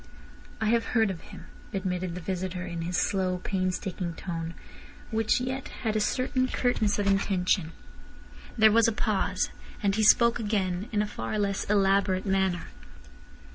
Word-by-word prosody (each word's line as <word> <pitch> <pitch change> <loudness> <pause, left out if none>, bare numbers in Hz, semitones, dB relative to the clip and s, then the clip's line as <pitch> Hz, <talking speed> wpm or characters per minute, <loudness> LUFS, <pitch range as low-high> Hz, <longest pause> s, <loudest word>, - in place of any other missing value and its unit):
"I 220 - -1
have 230 0 +3
heard 220 -3 +4
of 170 - -7
him," - - -12 0.3
admitted 185 -2 -2
the 180 - -5
visitor 185 0 -3
in 170 -1 -5
his 175 +2 -2
slow, 185 -2 +1
painstaking 185 -2 -2
tone, 165 -2 -5 0.6
which 220 +1 +2
yet 260 +1 -3 0.2
had 220 -2 0
a - - +3
certain 255 +3 +1
curtness 235 -5 +1
of 205 - 0
intention. 190 -3 +1 0.9
There 220 -1 +7
was 230 +1 +5
a - - +3
pause. 200 -3 0 0.3
Then 200 - +3
he 220 - +1
spoke 235 +2 +5
again, 200 -2 -1
in 210 -1 +1
a - - -3
far 215 - -4
less 200 -1 0
elaborate 195 -1 +2
manner. 190 -3 +1
195 Hz, 155 wpm, -28 LUFS, 185-220 Hz, 0.9 s, There